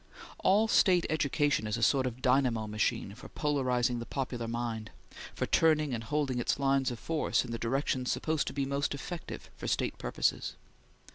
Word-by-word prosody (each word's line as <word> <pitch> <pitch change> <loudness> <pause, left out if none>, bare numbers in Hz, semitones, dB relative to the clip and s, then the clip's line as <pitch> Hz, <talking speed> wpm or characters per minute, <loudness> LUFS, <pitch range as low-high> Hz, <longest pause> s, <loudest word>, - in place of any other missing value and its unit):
All 205 +4 +4
State 180 -5 +4
education 145 -5 +1
is 105 +2 -1
a 115 - -2
sort 130 0 +3
of 125 +1 -7
dynamo 125 -4 +2
machine 105 -2 -1
for 105 - -12
polarizing 125 -4 0
the 115 - -5
popular 125 -4 -3
mind; 115 -2 -3 0.5
for - - -1
turning 155 -4 +3
and 115 -1 -3
holding 135 0 -1
its 120 - 0
lines 135 -1 +2
of 120 - -5
force 160 0 0
in 120 - -7
the 115 - -3
direction 130 +1 -1
supposed 155 +2 0
to - - -3
be 140 -1 -1
most 140 +1 -1
effective 165 +4 -7
for - - -6
State - - -1
purposes. - - -1
130 Hz, 180 wpm, -31 LUFS, 115-145 Hz, 0.5 s, All